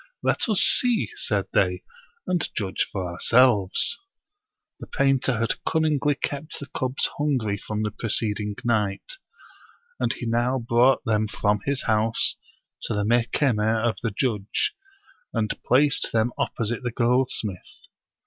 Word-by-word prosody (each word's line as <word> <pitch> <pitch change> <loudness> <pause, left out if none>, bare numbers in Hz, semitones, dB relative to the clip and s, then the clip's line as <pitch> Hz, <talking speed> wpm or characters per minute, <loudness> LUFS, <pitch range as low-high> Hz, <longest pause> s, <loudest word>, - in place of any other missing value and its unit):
" - - -50
Let - - +1
us 210 - +3
see," 245 -3 +4
said 100 -3 -1
they, 90 -1 +1 0.2
" - - -38
and 180 -3 -1
judge 95 -4 -1
for 95 -3 -3
ourselves." 115 - +2 0.8
The - - -9
painter 135 -3 +1
had 115 +1 -2
cunningly 150 -2 +1
kept 145 +2 -5
the 140 - -7
cubs 130 +1 -1
hungry 125 -9 0
from 105 +1 -4
the 105 - -2
preceding 105 -2 -1
night; 110 - -1 0.8
and - - +1
he 120 - -5
now 120 +3 +1
brought 120 +3 +3
them 110 -2 +1
from 105 0 0
his 140 -1 -1
house 110 0 +1 0.5
to - - -2
the 105 0 0
Mehkemeh 115 -1 +1
of 110 -5 -2
the 115 - -1
judge, 110 - -1 0.6
and 110 -2 0
placed 140 +3 +2
them 115 +1 +1
opposite 115 +1 -2
the 125 - -2
goldsmith. 120 -5 -1
115 Hz, 140 wpm, -24 LUFS, 105-135 Hz, 0.8 s, see